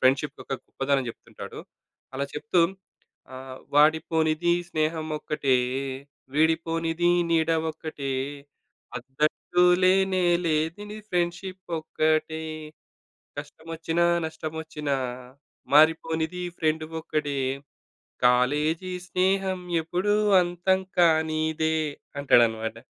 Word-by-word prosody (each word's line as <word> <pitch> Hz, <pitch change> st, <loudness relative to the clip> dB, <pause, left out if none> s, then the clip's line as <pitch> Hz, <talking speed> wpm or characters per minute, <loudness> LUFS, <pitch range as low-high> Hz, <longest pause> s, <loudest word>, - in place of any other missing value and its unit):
Friendship 135 Hz, +3 st, +2 dB
యొక్క -, -, -7 dB
గొప్పదనం 135 Hz, -1 st, -1 dB
చెప్తుంటాడు. -, -, -11 dB, 0.6 s
అలా 140 Hz, -, -1 dB
చెప్తూ 175 Hz, +3 st, +1 dB, 0.7 s
ఆహ్, 130 Hz, 0 st, -9 dB, 0.2 s
వాడిపోనిది 160 Hz, +2 st, +3 dB, 0.2 s
స్నేహమొక్కటే, 155 Hz, -3 st, -1 dB, 0.8 s
వీడిపోనిది 165 Hz, +2 st, +1 dB, 0.2 s
నీడ 165 Hz, 0 st, +2 dB, 0.2 s
ఒక్కటే, 155 Hz, -3 st, -6 dB, 0.8 s
హ‌ద్దంటూ 140 Hz, +7 st, 0 dB, 0.2 s
లేనేలేనిది 185 Hz, 0 st, +2 dB
ఫ్రెండ్‌షిప్పొక్కటే, 170 Hz, -3 st, -1 dB, 1.0 s
కష్టమొచ్చినా 165 Hz, +3 st, -2 dB, 0.2 s
నష్టమొచ్చినా, 155 Hz, -2 st, -4 dB, 0.8 s
మారిపోనిది 160 Hz, +3 st, +3 dB
ఫ్రెండు 155 Hz, 0 st, 0 dB, 0.2 s
ఒక్కడే, 145 Hz, -3 st, -2 dB, 0.9 s
కాలేజీ 150 Hz, +9 st, +2 dB, 0.2 s
స్నేహం 190 Hz, +1 st, +1 dB, 0.2 s
ఎపుడూ 180 Hz, +5 st, 0 dB, 0.3 s
అంతం 175 Hz, +2 st, +1 dB, 0.2 s
కానీదే 160 Hz, -1 st, +2 dB, 0.4 s
అంటాడనమాట. 115 Hz, -4 st, +3 dB
160 Hz, 70 wpm, -26 LUFS, 150-175 Hz, 1.0 s, వాడిపోనిది